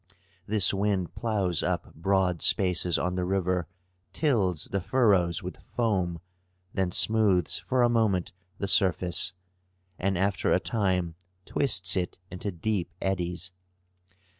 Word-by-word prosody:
This 100 -3 +4
wind 95 -4 -1
ploughs 100 -6 -1
up - - -3
broad 90 -1 0
spaces 90 -2 +3
on 90 +1 -1
the 90 0 -2
river, 90 -2 -1 0.5
tills 100 - +1
the 100 - -3
furrows 95 -7 +2
with - - -8
foam, 95 -8 0 0.5
then 95 -2 0
smooths 100 -3 +2
for 130 -1 0
a - - +5
moment 105 -5 +1 0.2
the 100 - -3
surface, 95 -1 +2 0.7
and 95 -1 0
after 100 +1 0
a - - +4
time 95 -6 -1 0.3
twists 105 -10 +2
it 90 -2 -2
into 90 +3 -4
deep 95 +1 -2
eddies. 90 -1 -3
95 Hz, 125 wpm, -27 LUFS, 90-105 Hz, 0.7 s, a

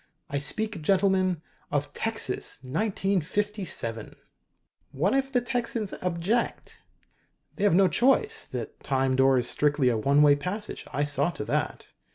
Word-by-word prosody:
"I 140 - 0
speak, 205 +5 -2
gentlemen, 185 -1 +2 0.3
of 145 0 -2
Texas, 220 - -1
1957!" 190 - -2 0.8
"What 170 +9 +1
if 270 0 0
the 250 -2 +2
Texans 235 -4 -2
object?" 180 +6 -2 0.7
"They 205 - -1
have 200 - +4
no 195 +1 +5
choice. 270 - +2
The - - -5
Time 135 -1 0
Door 135 0 +4
is 120 -1 +2
strictly 145 -2 +3
a 115 - +1
one 140 +6 +4
way 145 -1 +6
passage. 185 +8 -5
I 145 - 0
saw 145 +2 +1
to - - -6
that. - - -3
180 Hz, 140 wpm, -27 LUFS, 145-210 Hz, 0.8 s, way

